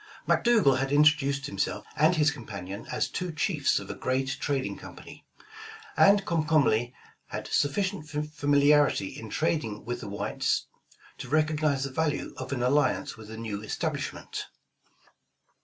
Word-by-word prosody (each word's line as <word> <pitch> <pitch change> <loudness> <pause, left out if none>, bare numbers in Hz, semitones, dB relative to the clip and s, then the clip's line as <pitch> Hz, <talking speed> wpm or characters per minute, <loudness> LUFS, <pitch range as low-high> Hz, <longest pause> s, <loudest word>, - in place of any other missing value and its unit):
McDougal 210 - +4
had 135 +1 -1
introduced 145 -2 +3
himself 145 - -2
and 155 +4 +4
his 150 -2 +3
companion 100 -7 -7
as - - 0
two 180 -1 -4
chiefs 155 -2 +1
of - - -4
a - - -4
great 130 +1 -1
trading 140 -2 -1
company, - - -12 0.7
and 200 0 +5
Comcom 155 -3 +2
ly 120 +3 +1 0.3
had - - -5
sufficient 190 +1 0
familiarity 145 -5 +2
in 110 - -9
trading 115 -8 -1
with 120 +1 -3
the - - -6
whites, 100 - -1 0.5
to 125 - -7
recognize 155 -2 +1
the 140 - -3
value 150 +2 -1
of - - -6
an 125 -3 -1
alliance 135 +1 +1
with 110 -1 -12
the 110 +1 -8
new 110 -3 -4
establishment. 110 - -4
145 Hz, 140 wpm, -28 LUFS, 125-155 Hz, 0.7 s, and